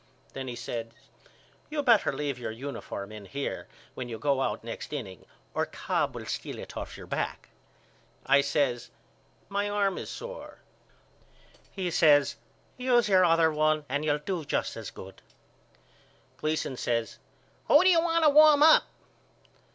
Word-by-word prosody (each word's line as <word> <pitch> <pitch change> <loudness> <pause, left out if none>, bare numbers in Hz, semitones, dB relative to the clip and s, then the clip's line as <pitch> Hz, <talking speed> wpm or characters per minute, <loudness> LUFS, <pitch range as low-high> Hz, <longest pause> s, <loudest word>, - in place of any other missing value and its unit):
Then 135 -1 -6
he 125 - -5
says 115 -1 -5 0.8
You 300 -1 -2
better 235 -6 +4
leave 145 -4 -3
your 120 - -4
uniform 110 -4 -6
in 105 -2 -9
here 140 +7 -4 0.3
when 125 -1 -6
you 115 - -5
go 140 +1 0
out 105 -4 -2
next 115 +4 -7
inning 105 -11 -7 0.3
or - - -1
Cobb - - -2
will - - -7
steal - - -5
it - - -9
off - - -6
your - - -10
back. - - -4 0.8
I 140 +1 +5
says 140 -4 -1 0.6
My 205 +1 -1
arm 200 -2 0
is - - -7
sore. - - -8 1.1
He 185 -3 -3
says 145 -3 +4 0.4
Use 245 -3 +2
your 185 -2 +5
other 165 -2 +4
one 155 0 +1
and 145 +3 -2
you'll 150 -1 +1
do 165 +3 -4
just - - -2
as 110 -3 -7
good. 95 0 -12 1.2
Gleason 155 -4 -2
says 115 -2 -2 0.5
Who 295 - +6
do 375 - +6
you 335 -2 +5
want 335 -1 +1
to 300 - +6
warm 300 0 +7
up? 315 0 +7
150 Hz, 155 wpm, -28 LUFS, 125-205 Hz, 1.2 s, warm